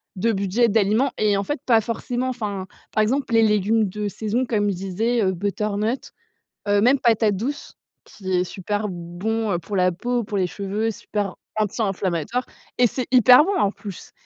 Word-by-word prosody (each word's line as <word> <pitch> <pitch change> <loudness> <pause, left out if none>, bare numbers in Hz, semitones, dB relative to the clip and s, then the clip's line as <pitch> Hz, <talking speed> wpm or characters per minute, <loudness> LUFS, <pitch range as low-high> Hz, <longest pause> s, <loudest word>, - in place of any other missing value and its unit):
de 230 +5 +1
budget, 200 +4 +1
d'aliments» 220 +5 +2
et 210 -2 +3
en 200 - -1
fait 290 +4 -3
pas 225 -2 +5
forcément. 245 +3 -3
Enfin, 205 -6 -4 0.3
par 215 - +2
exemple 260 +3 -1
les 225 0 +5
légumes 210 0 +2
de 210 +2 -4
saison 220 +5 -1
comme 205 -3 0
je - - -3
disais, 215 +6 -1
heu, 190 - +2
butternut, 210 +5 -2 0.6
heu, 205 0 +3
même 255 +5 +4
patate 220 -4 +2
douce, 275 +8 -5 0.3
qui 190 -2 -7
est 180 - +1
super 205 +3 -3
bon, 190 +5 -3
heu, 175 - 0
pour 195 +4 -5
la 180 -1 +3
peau, 240 +5 -2
pour 205 -2 -3
les 185 - +2
cheveux, 205 +4 -2
super 205 -2 -4 0.2
anti-inflammatoire 200 +1 -1 0.3
et 245 - +6
c'est 250 +2 -3
hyper 250 +3 +7
bon 400 +2 0
en 200 - +3
plus. 200 -4 -10
210 Hz, 180 wpm, -23 LUFS, 195-235 Hz, 0.6 s, hyper